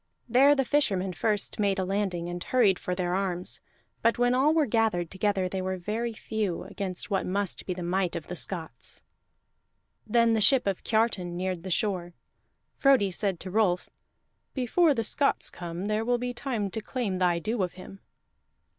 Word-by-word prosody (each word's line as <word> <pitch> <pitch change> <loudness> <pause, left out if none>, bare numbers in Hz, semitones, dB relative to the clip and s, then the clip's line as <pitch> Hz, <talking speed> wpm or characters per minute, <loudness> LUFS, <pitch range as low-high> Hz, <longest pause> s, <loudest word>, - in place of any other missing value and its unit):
There 270 +5 +6
the 270 -2 +1
fishermen 195 -10 +1
first 205 +6 0
made 200 -1 +2
a 190 - 0
landing, 190 -3 -1
and 175 0 -5
hurried 220 -8 +3
for 180 - -3
their 180 -1 -1
arms; 185 -2 -1 0.4
but 230 +1 +3
when 245 0 +3
all 270 +4 +4
were 315 -2 +3
gathered 220 -8 +1
together 190 -1 0
they 190 +1 -3
were 185 0 -2
very 220 +6 -2
few 215 -5 -3
against 185 -2 -4
what 195 - +1
must 200 0 -1
be 180 - -2
the 180 - -5
might 180 +1 0
of 170 - -4
the 180 - -6
Scots. 160 -8 -3 1.0
Then 230 +1 +4
the 220 - +2
ship 265 +3 +5
of 195 -2 -1
Kiartan 205 -6 0
neared 185 -1 -2
the 185 - -7
shore. 180 -2 -1 0.6
Frodi 265 -8 +4
said 190 -1 -1
to 185 - -6
Rolf: 190 -4 +1 0.6
"Before 290 +5 +3
the 230 - 0
Scots 275 +5 +1
come 175 +2 -6
there 215 +1 0
will 245 +1 +1
be 245 0 -3
time 235 -6 -3
to 220 - -4
claim 215 -6 -3
thy 175 -2 +3
due 215 +6 -2
of 180 -2 -1
him." 190 +1 -11
195 Hz, 180 wpm, -28 LUFS, 180-230 Hz, 1.0 s, There